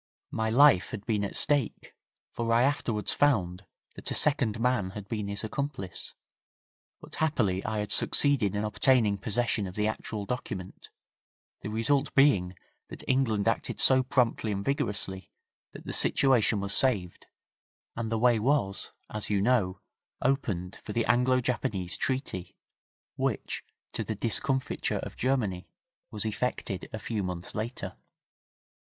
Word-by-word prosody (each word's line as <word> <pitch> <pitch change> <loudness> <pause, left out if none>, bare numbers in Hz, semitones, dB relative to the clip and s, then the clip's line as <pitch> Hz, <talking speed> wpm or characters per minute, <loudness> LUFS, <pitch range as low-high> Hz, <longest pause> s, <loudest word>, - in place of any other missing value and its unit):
My 110 0 -1
life 125 -5 +6
had 105 -1 -7
been 105 -3 0
at 100 - -4
stake, 145 -6 0 0.4
for 115 -1 -2
I 115 +1 +5
afterwards 120 -6 0
found 95 -10 +1 0.3
that - - -6
a - - -2
second 130 -7 +3
man 120 -5 +1
had 100 -1 -7
been 105 -2 -3
his 100 +2 -2
accomplice, 110 - -4 0.9
but - - -13
happily 115 -12 0
I 110 0 -2
had 105 0 -3
succeeded 125 -9 +3
in 105 - -1
obtaining 110 -2 +3
possession 110 -1 0
of 90 - -9
the 105 - 0
actual 110 -1 -3
document, 100 -6 -6 0.7
the - - -5
result 135 +6 +1
being 100 -11 +4 0.3
that - - -7
England 120 -6 +1
acted - - -1
so 130 0 +6
promptly 125 -4 +1
and 100 0 -3
vigorously 100 -8 -2 0.4
that - - -11
the - - -4
situation 120 -6 +3
was 100 0 -1
saved, 100 -10 +1 0.7
and 115 -1 -3
the 115 - +1
way 120 0 +4
was, 110 -5 0 0.2
as 105 -1 -2
you 105 -1 +2
know, 100 -4 +1 0.4
opened 100 -10 -1
for 105 - -8
the 115 +1 +1
Anglo 125 +1 +3
Japanese 100 -7 -1
Treaty, 130 -9 -3 0.6
which, - - -2 0.3
to - - -2
the 110 - -4
discomfiture 130 +5 -1
of - - -6
Germany, 110 -9 -1 0.4
was 105 0 -4
effected 110 -4 -3
a 110 - -4
few 110 0 -3
months 90 -2 -4
later. 115 +4 -5
110 Hz, 145 wpm, -29 LUFS, 100-130 Hz, 0.9 s, life